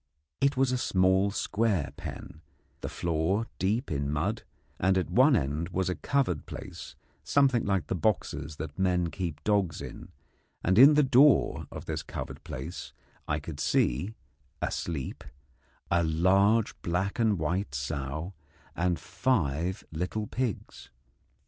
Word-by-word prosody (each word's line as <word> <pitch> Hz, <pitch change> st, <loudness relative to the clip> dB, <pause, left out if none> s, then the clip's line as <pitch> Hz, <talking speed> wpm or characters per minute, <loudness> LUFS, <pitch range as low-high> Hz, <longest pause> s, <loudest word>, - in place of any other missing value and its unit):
It 140 Hz, 0 st, +2 dB
was 130 Hz, -1 st, +3 dB
a 125 Hz, -, 0 dB
small 95 Hz, -1 st, +3 dB
square 100 Hz, -6 st, 0 dB
pen, 75 Hz, -, -8 dB, 0.4 s
the -, -, -5 dB
floor 85 Hz, +6 st, 0 dB
deep 105 Hz, +7 st, 0 dB
in 70 Hz, -1 st, -1 dB
mud, 90 Hz, +10 st, -1 dB, 0.4 s
and 95 Hz, +1 st, +3 dB
at 95 Hz, -, -1 dB
one 130 Hz, +3 st, +6 dB
end 75 Hz, -, -1 dB
was 95 Hz, 0 st, -1 dB
a -, -, -2 dB
covered 130 Hz, -, 0 dB
place -, -, -8 dB, 0.3 s
something 135 Hz, -4 st, +3 dB
like 95 Hz, -4 st, +1 dB
the -, -, -2 dB
boxes 80 Hz, -6 st, -1 dB
that 80 Hz, +4 st, -7 dB
men 90 Hz, -3 st, +1 dB
keep 85 Hz, -5 st, -4 dB
dogs 100 Hz, -7 st, +1 dB
in; -, -, -8 dB, 0.5 s
and 95 Hz, +4 st, +3 dB
in 140 Hz, +4 st, +9 dB
the 150 Hz, -, +5 dB
door 135 Hz, +2 st, +4 dB
of -, -, -8 dB
this -, -, -3 dB
covered -, -, -7 dB
place 65 Hz, +7 st, -7 dB, 0.3 s
I 75 Hz, 0 st, 0 dB
could 75 Hz, 0 st, -8 dB
see, 75 Hz, -, +1 dB, 0.4 s
asleep, 75 Hz, -6 st, -3 dB, 0.7 s
a 85 Hz, 0 st, +3 dB
large 95 Hz, +7 st, +3 dB
black 95 Hz, +5 st, -1 dB
and 110 Hz, -4 st, +3 dB
white 80 Hz, +1 st, -2 dB
sow 70 Hz, +5 st, -3 dB, 0.4 s
and 90 Hz, 0 st, +1 dB
five 95 Hz, -, -1 dB
little 90 Hz, +7 st, -2 dB
pigs. 120 Hz, -1 st, -4 dB
95 Hz, 140 wpm, -29 LUFS, 80-110 Hz, 0.7 s, in